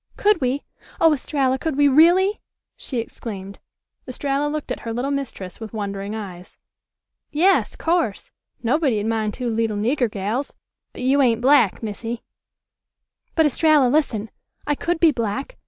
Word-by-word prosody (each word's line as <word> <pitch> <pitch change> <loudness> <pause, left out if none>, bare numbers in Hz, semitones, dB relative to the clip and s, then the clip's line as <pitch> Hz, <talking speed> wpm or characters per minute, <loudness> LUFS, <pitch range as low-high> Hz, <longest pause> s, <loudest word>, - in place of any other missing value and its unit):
"Could 420 -4 +3
we? 260 +2 0 0.4
Oh, 325 -1 +5
Estralla, 265 -2 0
could 315 -2 -2
we 290 0 +5
really?" 350 +8 +5 0.3
she 255 - -6
exclaimed. 200 -4 -6 0.5
Estralla 275 +3 -1
looked 305 -1 -4
at - - -3
her 230 - -5
little 245 +5 -2
mistress 240 -10 -5
with 220 -1 -8
wondering 200 0 -4
eyes. 185 -4 -8 0.7
"Yas, 365 +6 +2
course; 330 - -1 0.3
nobody'd 245 -4 +1
mind 220 -2 -1
two 250 - -3
leetle 225 -2 0
nigger 245 +3 +1
gals. 210 +7 -3 0.4
But - - -8
you 275 +2 +3
ain't 235 -4 +3
black, 250 -5 +4
Missy." 225 +2 -5 1.1
"But, 320 - +4
Estralla, 300 -2 +4
listen. 235 -7 0 0.3
I 295 - +1
could 340 +3 -2
be 330 -2 +6
black. 245 - -3
255 Hz, 145 wpm, -22 LUFS, 220-295 Hz, 1.1 s, be